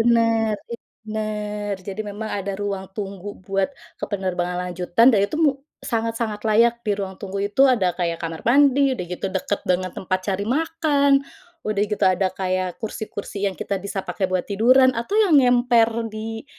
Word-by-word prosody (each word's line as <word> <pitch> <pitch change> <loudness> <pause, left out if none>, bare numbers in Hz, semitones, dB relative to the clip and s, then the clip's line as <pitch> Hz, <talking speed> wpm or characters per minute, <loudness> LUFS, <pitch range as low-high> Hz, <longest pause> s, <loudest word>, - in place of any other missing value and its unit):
bener 230 -1 +3 0.2
itu 235 - -7 0.2
bener, 210 -1 -3
jadi 195 +2 -6
memang 210 +1 -5
ada 200 -1 -3
ruang 200 -2 -3
tunggu 200 -1 -6
buat 195 +1 -1 0.3
ke - - -1
penerbangan 180 -2 -2
lanjutan 180 +6 +3
dan 205 - +4
itu 205 - -3
mu 305 - +5 0.3
sangat-sangat 225 -2 -2
layak 230 +2 +4
di 210 - +1
ruang 195 -2 -4
tunggu 195 0 -5
itu, 265 +6 +4
ada 215 -10 +3
kayak 170 -2 -2
kamar 165 -1 -5
mandi, 275 +2 +4
udah 215 -8 -3
gitu 180 +2 -4
deket 195 +2 -1
banget 185 0 0
tempat 185 0 -1
cari 195 +1 -1
makan, 295 +2 +1 0.5
udah 210 -1 0
gitu 210 -1 0
ada 185 0 +3
kayak 185 -1 -2
kursi-kursi 205 -2 -4
yang 190 - -8
kita 200 +3 -3
bisa 195 0 -4
pakai 190 -2 -2
buat 185 -1 0
tiduran, 255 +6 +4
atau 235 - -2
yang 365 -10 +6
ngemper 245 -2 +4 0.2
di 225 +2 -6
210 Hz, 170 wpm, -22 LUFS, 190-230 Hz, 0.5 s, yang